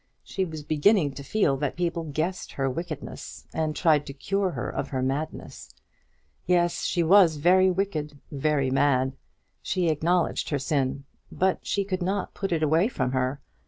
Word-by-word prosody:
She 190 Hz, -, -2 dB
was 160 Hz, -3 st, -7 dB
beginning 155 Hz, +2 st, +3 dB
to 140 Hz, -, -8 dB
feel 140 Hz, -4 st, +1 dB
that 145 Hz, 0 st, -2 dB
people 170 Hz, -1 st, -2 dB
guessed 160 Hz, +5 st, -3 dB
her 135 Hz, -1 st, -1 dB
wickedness, 155 Hz, +2 st, -6 dB
and 155 Hz, -1 st, -1 dB
tried 150 Hz, -4 st, +3 dB
to 140 Hz, -, -6 dB
cure 195 Hz, +7 st, -1 dB
her -, -, -4 dB
of -, -, -3 dB
her 130 Hz, -3 st, -2 dB
madness. 140 Hz, +4 st, -4 dB, 0.8 s
Yes; 175 Hz, -1 st, +2 dB
she 175 Hz, -2 st, +1 dB
was 175 Hz, -1 st, +6 dB
very 185 Hz, +5 st, +4 dB
wicked 170 Hz, -6 st, -2 dB
very 140 Hz, -2 st, 0 dB
mad. 135 Hz, -1 st, +2 dB, 0.5 s
She 180 Hz, -3 st, 0 dB
acknowledged 165 Hz, +3 st, +1 dB
her 145 Hz, -, 0 dB
sin, 135 Hz, -1 st, -1 dB, 0.3 s
but 190 Hz, 0 st, 0 dB
she 200 Hz, -, +1 dB
could 185 Hz, -1 st, -3 dB
not 190 Hz, +2 st, -2 dB
put 195 Hz, -2 st, -4 dB
it 160 Hz, -2 st, +1 dB
away 160 Hz, +6 st, +3 dB
from 130 Hz, -, -2 dB
her. 130 Hz, +2 st, -1 dB
155 Hz, 165 wpm, -26 LUFS, 140-180 Hz, 0.8 s, was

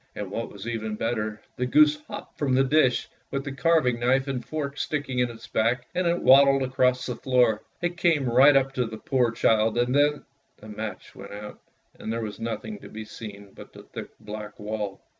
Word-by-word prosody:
And 100 Hz, -2 st, -5 dB
what 115 Hz, +3 st, -4 dB
was 100 Hz, 0 st, -10 dB
even 110 Hz, -2 st, -3 dB
better, 110 Hz, -1 st, -2 dB, 0.2 s
the 125 Hz, -, -1 dB
goose 150 Hz, +3 st, +5 dB
hopped -, -, -9 dB
from 135 Hz, -3 st, +1 dB
the 135 Hz, -, +4 dB
dish 135 Hz, -2 st, +2 dB, 0.2 s
with 135 Hz, 0 st, -3 dB
the 140 Hz, -, -5 dB
carving 135 Hz, -4 st, +2 dB
knife 130 Hz, +3 st, +2 dB
and 130 Hz, -3 st, -3 dB
fork 140 Hz, +1 st, -4 dB
sticking 140 Hz, -4 st, -2 dB
in 125 Hz, -1 st, +2 dB
his 115 Hz, 0 st, -10 dB
back, 120 Hz, +2 st, 0 dB
and 180 Hz, -1 st, 0 dB
it 170 Hz, +1 st, 0 dB
waddled 135 Hz, 0 st, +6 dB
across 130 Hz, 0 st, +1 dB
the -, -, -3 dB
floor. 125 Hz, -5 st, +2 dB, 0.2 s
It 175 Hz, 0 st, -1 dB
came 160 Hz, -7 st, +2 dB
right 135 Hz, +4 st, +6 dB
up 135 Hz, 0 st, +1 dB
to 125 Hz, -3 st, 0 dB
the 110 Hz, 0 st, -7 dB
poor 125 Hz, +1 st, +1 dB
child, 110 Hz, 0 st, +2 dB
and 120 Hz, +1 st, +1 dB
then 145 Hz, +1 st, +2 dB, 0.2 s
— -, -, -44 dB
the 110 Hz, -, -12 dB
match 105 Hz, 0 st, -7 dB
went 100 Hz, +1 st, -10 dB
out, 105 Hz, +1 st, -8 dB, 0.4 s
and 110 Hz, -, -4 dB
there 115 Hz, 0 st, -2 dB
was 105 Hz, -1 st, -6 dB
nothing 115 Hz, -, -5 dB
to -, -, -12 dB
be 110 Hz, 0 st, -7 dB
seen 100 Hz, -2 st, -10 dB
but -, -, -13 dB
the -, -, -12 dB
thick -, -, -8 dB
black 105 Hz, 0 st, -8 dB
wall. 105 Hz, -2 st, -4 dB
125 Hz, 215 wpm, -26 LUFS, 110-135 Hz, 0.4 s, waddled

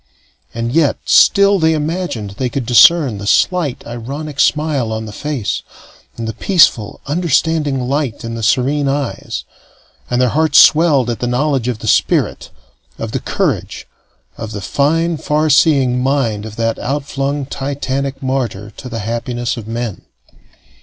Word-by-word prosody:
And 115 Hz, +1 st, -3 dB
yet 155 Hz, 0 st, +2 dB
still 200 Hz, 0 st, +5 dB
they 160 Hz, -1 st, +3 dB
imagined 150 Hz, -, -3 dB
they 125 Hz, +5 st, -3 dB
could 125 Hz, 0 st, -3 dB
discern 135 Hz, -2 st, +5 dB
the 100 Hz, -, -6 dB
slight 165 Hz, -, +1 dB
ironic 140 Hz, +5 st, -7 dB
smile 150 Hz, -6 st, +1 dB
on 110 Hz, 0 st, -4 dB
the 105 Hz, -, -8 dB
face, 135 Hz, -2 st, -3 dB, 0.6 s
and 115 Hz, -1 st, -4 dB
the 110 Hz, -, -3 dB
peaceful, 120 Hz, -, +2 dB
understanding 155 Hz, -2 st, 0 dB
light 130 Hz, -1 st, -2 dB
in 115 Hz, -, -5 dB
the 115 Hz, -, -5 dB
serene 130 Hz, +5 st, +1 dB
eyes; 140 Hz, -2 st, -3 dB, 0.7 s
and 125 Hz, -, 0 dB
their 125 Hz, -1 st, +3 dB
hearts 155 Hz, +2 st, +2 dB
swelled 150 Hz, -6 st, +5 dB
at 115 Hz, -, -5 dB
the 120 Hz, -, -2 dB
knowledge 130 Hz, 0 st, 0 dB
of 125 Hz, -3 st, -1 dB
the -, -, -8 dB
spirit, -, -, +1 dB, 0.5 s
of -, -, -5 dB
the -, -, -2 dB
courage, -, -, -2 dB, 0.5 s
of 110 Hz, 0 st, -6 dB
the 100 Hz, -, -5 dB
fine, 165 Hz, -, 0 dB
far 150 Hz, 0 st, 0 dB
seeing 135 Hz, -4 st, +3 dB
mind 125 Hz, -6 st, 0 dB
of 110 Hz, -, -10 dB
that 115 Hz, 0 st, -1 dB
outflung 140 Hz, +1 st, -2 dB
titanic 135 Hz, 0 st, -4 dB
martyr 120 Hz, -6 st, -3 dB
to 125 Hz, -, -8 dB
the 115 Hz, -2 st, -4 dB
happiness 120 Hz, +1 st, -3 dB
of 115 Hz, -3 st, -8 dB
men. 115 Hz, -3 st, -4 dB
135 Hz, 155 wpm, -16 LUFS, 115-150 Hz, 0.7 s, still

